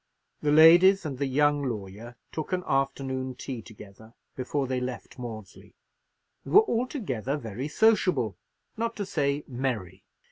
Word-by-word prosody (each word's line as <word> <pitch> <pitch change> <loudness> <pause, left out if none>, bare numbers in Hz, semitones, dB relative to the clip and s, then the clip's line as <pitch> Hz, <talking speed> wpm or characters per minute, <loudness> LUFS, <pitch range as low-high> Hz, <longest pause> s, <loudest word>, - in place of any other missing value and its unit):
The 150 - +1
ladies 175 +5 +7
and 135 -4 -5
the 140 - 0
young 145 +2 +2
lawyer 110 -1 -6 0.2
took 160 +3 -5
an 180 0 0
afternoon 135 -1 -1
tea 125 -2 -6
together 110 +1 -14 0.2
before 135 +2 -2
they 130 -1 -2
left 125 +1 -6
Maudesley, 110 -5 -9 0.7
and - - -8
were 420 - +9
altogether 210 - -2
very 120 +1 -5
sociable, 155 - +2 0.4
not 230 +1 -2
to 205 - -3
say 145 -3 -1
merry. 120 -8 -4
135 Hz, 140 wpm, -27 LUFS, 120-155 Hz, 0.7 s, were